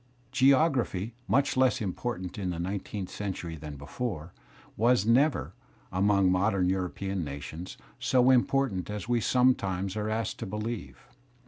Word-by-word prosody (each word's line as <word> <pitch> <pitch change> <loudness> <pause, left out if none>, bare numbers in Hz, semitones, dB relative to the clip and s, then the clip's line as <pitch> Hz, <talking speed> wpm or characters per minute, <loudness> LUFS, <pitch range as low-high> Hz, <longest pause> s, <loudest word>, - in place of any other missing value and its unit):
Geography, 130 - +3
much 140 +7 +2
less 130 -1 +3
important 95 -2 -4
in 95 -2 -2
the 85 - -3
nineteenth 95 +2 -4
century 90 -5 -4
than 75 -1 -8
before, 80 - -5 0.4
was 115 -2 +3
never, 130 +6 +2 0.4
among 100 0 +3
modem 95 0 +2
European 95 0 -2
nations, 75 +5 -7 0.2
so 130 0 +4
important 125 -7 +2
as 105 +1 -5
we 120 -1 +1
sometimes 100 -7 +2
are 105 0 -2
asked 110 +1 -2
to - - -4
believe. 110 +5 -5
100 Hz, 130 wpm, -29 LUFS, 90-125 Hz, 0.4 s, so